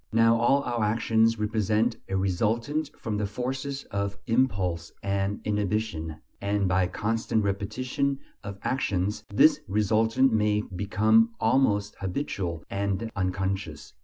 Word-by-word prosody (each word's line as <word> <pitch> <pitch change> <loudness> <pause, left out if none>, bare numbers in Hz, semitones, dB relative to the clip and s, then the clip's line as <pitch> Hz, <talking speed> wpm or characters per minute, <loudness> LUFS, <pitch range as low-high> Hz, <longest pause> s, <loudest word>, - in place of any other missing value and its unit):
Now 115 +1 +5
all 135 +4 +3
our 120 -2 -1
actions 115 +1 +2
represent 110 +2 +1
a 95 - 0
resultant 115 - 0 0.2
of 105 -2 -1
the 105 - 0
forces 130 +5 -4
of 100 0 -2
impulse 95 -9 0
and 100 +1 -1
inhibition, 105 -6 -1 0.3
and 100 -1 +1
by 90 0 +2
constant 110 +3 -1
repetition 125 +8 -1 0.3
of 100 -1 -6
actions 105 -4 -1
this 145 +7 +5
resultant 110 +5 +2
may 105 -1 +2
become 110 +4 +3
almost 110 -3 +2
habitual 90 - -3
and 100 +2 -2
unconscious. 95 -4 -3
105 Hz, 120 wpm, -27 LUFS, 100-115 Hz, 0.3 s, Now